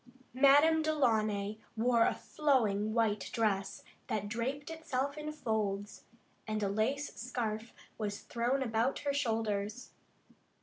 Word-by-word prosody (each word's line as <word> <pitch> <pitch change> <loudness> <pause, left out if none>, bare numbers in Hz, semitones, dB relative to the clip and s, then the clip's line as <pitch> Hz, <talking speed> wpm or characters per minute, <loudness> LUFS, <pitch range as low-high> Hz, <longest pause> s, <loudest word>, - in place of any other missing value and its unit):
Madame 290 +5 +6
Delaunay 215 -9 +1 0.2
wore 235 0 +4
a - - 0
flowing 220 -8 +1
white 210 -5 +1
dress 200 -3 0 0.2
that 205 -1 -2
draped 260 +7 -3
itself 280 -4 -2
in 305 0 -5
folds, 210 -7 -2 0.4
and 215 -1 -1
a 200 - +1
lace 255 +8 -1
scarf 230 -2 -3 0.3
was 205 -1 -3
thrown 245 +3 0
about 230 +2 +1
her 285 - +1
shoulders. 225 -4 -1
230 Hz, 120 wpm, -33 LUFS, 210-275 Hz, 0.4 s, Madame